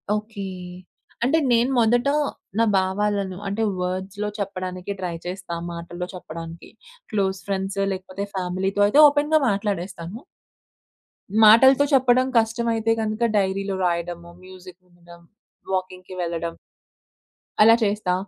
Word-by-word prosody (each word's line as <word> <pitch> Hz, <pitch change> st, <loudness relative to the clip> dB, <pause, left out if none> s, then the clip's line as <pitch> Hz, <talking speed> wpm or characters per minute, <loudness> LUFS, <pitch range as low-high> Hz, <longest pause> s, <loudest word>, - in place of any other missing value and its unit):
Okay. 210 Hz, -2 st, -5 dB, 0.8 s
అంటే 285 Hz, +6 st, +3 dB
నేను 240 Hz, +3 st, +3 dB
మొదట 240 Hz, +3 st, +3 dB, 0.5 s
నా 230 Hz, -, +5 dB
భావాలను 190 Hz, 0 st, 0 dB
అంటే 205 Hz, +3 st, -1 dB, 0.2 s
వర్డ్స్‌లో 190 Hz, +3 st, -3 dB
చెప్పడానికి 185 Hz, -1 st, -4 dB
ట్రై 180 Hz, -2 st, -3 dB
చేస్తా 180 Hz, -1 st, -5 dB, 0.2 s
మాటల్లో 175 Hz, +1 st, -6 dB
చెప్పడానికి. 165 Hz, -1 st, -9 dB, 0.4 s
క్లోజ్ 195 Hz, -3 st, 0 dB
ఫ్రెండ్స్ 195 Hz, 0 st, -2 dB
లేకపోతే 190 Hz, +1 st, -5 dB
ఫ్యామిలీతో 190 Hz, +2 st, -1 dB
అయితే 280 Hz, +9 st, +3 dB
ఓపెన్‌గా 295 Hz, +2 st, +2 dB
మాట్లాడేస్తాను. 195 Hz, 0 st, -3 dB, 1.2 s
మాటలతో 265 Hz, +6 st, +7 dB
చెప్పడం 255 Hz, -1 st, +4 dB
కష్టమైతే 225 Hz, 0 st, 0 dB
గనక 220 Hz, +2 st, 0 dB
డైరీలో 195 Hz, 0 st, 0 dB
రాయడము 170 Hz, 0 st, -3 dB
మ్యూజిక్ 185 Hz, -1 st, -13 dB
వినడం, 175 Hz, -1 st, -17 dB, 0.5 s
వాకింగ్‌కి 185 Hz, 0 st, -4 dB
వెళ్ళడం 170 Hz, -1 st, -3 dB, 1.1 s
అలా 225 Hz, +2 st, +8 dB
చేస్తా. 205 Hz, -3 st, 0 dB
195 Hz, 105 wpm, -23 LUFS, 180-220 Hz, 1.2 s, అలా